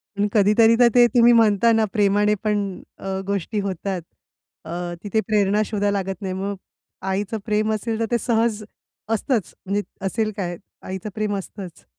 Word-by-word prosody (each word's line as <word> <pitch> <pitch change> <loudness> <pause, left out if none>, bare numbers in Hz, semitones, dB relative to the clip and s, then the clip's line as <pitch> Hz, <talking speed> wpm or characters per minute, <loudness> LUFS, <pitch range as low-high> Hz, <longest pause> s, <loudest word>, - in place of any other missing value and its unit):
पण 205 +1 +1
कधीतरी 220 +2 +5
तर 245 - +7
ते 245 -1 +8
तुम्ही 240 0 +7
म्हणता 225 0 +4
ना, 225 -1 +3
प्रेमाने 210 0 +3
पण 210 -1 +1 0.4
अ, 190 0 -4
गोष्टी 200 +2 -2
होतात. 190 -1 -3 0.6
अ, 160 - -7 0.3
तिथे 210 +2 0
प्रेरणा 210 -1 +2
शोधायला 205 -1 0
लागत 195 +1 -4
नाही. 190 -1 -3
मग, 195 +2 -3 0.5
आईचं 195 +3 -2
प्रेम 215 0 +1
असेल 220 +1 -2
तर 225 - +1
ते 240 - +3
सहज 225 -2 0 0.5
असतंच, 225 - 0
म्हणजे 200 +2 0 0.2
असेल 215 +2 0
काय? 175 -3 -3 0.3
आईचं 190 +3 -5
प्रेम 215 -1 -1
असतंच. 190 -3 -9
210 Hz, 160 wpm, -22 LUFS, 195-220 Hz, 0.6 s, ते